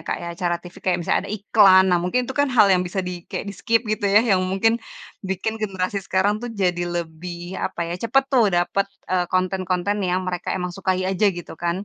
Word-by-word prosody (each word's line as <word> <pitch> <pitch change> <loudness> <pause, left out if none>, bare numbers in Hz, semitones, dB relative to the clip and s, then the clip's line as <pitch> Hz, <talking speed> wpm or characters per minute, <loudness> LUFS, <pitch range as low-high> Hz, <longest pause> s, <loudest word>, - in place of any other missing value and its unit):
Kak - - 0
ya, 170 - -5
acara 175 -1 0
TV 175 0 -12
kayak 185 -2 +2
misalnya 170 - +1
ada 205 - -6
iklan, 200 -2 +5
nah 180 - +4
mungkin 185 +8 +1
itu 265 - -4
kan 285 -1 +3
hal 215 -5 +6
yang 180 -1 +3
bisa 185 +2 -2
di 180 -2 -6
kayak 205 - -5
di-skip 230 +3 +1
gitu 215 -1 -1
ya 200 +2 +5 0.2
yang 185 - +1
mungkin 195 +5 +2 0.5
bikin 190 +4 -2
generasi 195 -3 -2
sekarang 195 +3 +1
tuh 240 - -5
jadi 180 -4 0 0.2
lebih 175 +2 -8
apa - - -4
ya, 170 - -3
cepet 270 +4 +3
tuh 230 -7 +3
dapet, 175 +3 +1 0.2
eee, 180 -1 +1
konten-konten 185 +1 0
yang 180 +1 0
mereka 180 -1 -3
emang 180 -1 -3
sukai 185 -1 0
aja 195 +2 +2
gitu 175 -2 -9
kan? 175 +4 -2
185 Hz, 215 wpm, -22 LUFS, 180-205 Hz, 0.5 s, hal